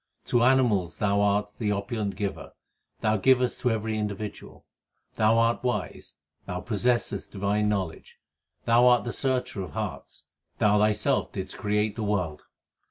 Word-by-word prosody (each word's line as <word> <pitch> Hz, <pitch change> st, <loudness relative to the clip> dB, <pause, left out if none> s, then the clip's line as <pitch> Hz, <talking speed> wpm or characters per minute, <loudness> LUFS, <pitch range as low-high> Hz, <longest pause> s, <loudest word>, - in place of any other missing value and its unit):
To 120 Hz, -, +2 dB
animals 120 Hz, -9 st, +2 dB
Thou 100 Hz, -1 st, +1 dB
art 105 Hz, 0 st, +1 dB
the 105 Hz, -2 st, 0 dB
opulent 105 Hz, 0 st, -2 dB
Giver 100 Hz, -2 st, -3 dB
l; -, -, -12 dB, 0.5 s
Thou 110 Hz, -1 st, +2 dB
givest 125 Hz, +3 st, +2 dB
to 125 Hz, -, +1 dB
every 110 Hz, -1 st, -1 dB
individual. 105 Hz, 0 st, -6 dB, 0.5 s
Thou 110 Hz, +1 st, +3 dB
art 115 Hz, +1 st, +2 dB
wise; 125 Hz, -10 st, -3 dB, 0.3 s
Thou 90 Hz, -2 st, -3 dB
possessest 115 Hz, -2 st, 0 dB
divine 105 Hz, +1 st, 0 dB
knowledge; 95 Hz, -6 st, -4 dB, 0.5 s
Thou 120 Hz, +1 st, +5 dB
art 125 Hz, -1 st, +5 dB
the 120 Hz, -, -4 dB
searcher 125 Hz, -6 st, -1 dB
of 90 Hz, -6 st, -7 dB
hearts; -, -, -6 dB, 0.3 s
Thou 105 Hz, 0 st, +3 dB
Thyself 105 Hz, 0 st, +1 dB
didst -, -, -5 dB
create 105 Hz, 0 st, 0 dB
the 115 Hz, -, -5 dB
world. 95 Hz, -7 st, -1 dB
105 Hz, 150 wpm, -26 LUFS, 100-120 Hz, 0.5 s, Thou